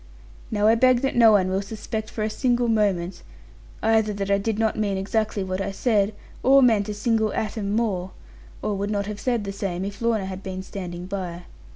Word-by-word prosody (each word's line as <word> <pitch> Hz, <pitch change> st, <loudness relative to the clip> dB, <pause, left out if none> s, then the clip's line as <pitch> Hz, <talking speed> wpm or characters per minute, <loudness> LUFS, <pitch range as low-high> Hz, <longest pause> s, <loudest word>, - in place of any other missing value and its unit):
Now 210 Hz, -1 st, 0 dB
I 220 Hz, -, +6 dB
beg 250 Hz, +1 st, +4 dB
that 270 Hz, -, -1 dB
no 230 Hz, -2 st, +7 dB
one 190 Hz, -3 st, +4 dB
will 190 Hz, +1 st, +1 dB
suspect 215 Hz, +1 st, -5 dB
for 215 Hz, -, -4 dB
a 215 Hz, -, 0 dB
single 245 Hz, 0 st, +1 dB
moment, 200 Hz, -5 st, 0 dB, 0.6 s
either 220 Hz, -1 st, +3 dB
that 200 Hz, 0 st, -3 dB
I 200 Hz, -, +3 dB
did 215 Hz, +1 st, -1 dB
not 220 Hz, -1 st, +1 dB
mean 200 Hz, -2 st, 0 dB
exactly 205 Hz, +1 st, -1 dB
what 185 Hz, 0 st, -3 dB
I -, -, -2 dB
said, 205 Hz, 0 st, +1 dB, 0.3 s
or 270 Hz, +1 st, +6 dB
meant 215 Hz, -4 st, +3 dB
a -, -, -2 dB
single 220 Hz, 0 st, +1 dB
atom 210 Hz, -1 st, -2 dB
more, 195 Hz, -6 st, 0 dB, 0.5 s
or 210 Hz, -, 0 dB
would 200 Hz, +1 st, -2 dB
not 200 Hz, -1 st, -1 dB
have 210 Hz, 0 st, -5 dB
said 240 Hz, -4 st, 0 dB
the 200 Hz, -, -4 dB
same, 190 Hz, -2 st, -3 dB
if 200 Hz, +2 st, -7 dB
Lorna 225 Hz, -4 st, +1 dB
had 190 Hz, 0 st, -6 dB
been 190 Hz, -1 st, -5 dB
standing 180 Hz, -2 st, -6 dB
by. 180 Hz, -2 st, -5 dB
205 Hz, 210 wpm, -24 LUFS, 195-225 Hz, 0.6 s, no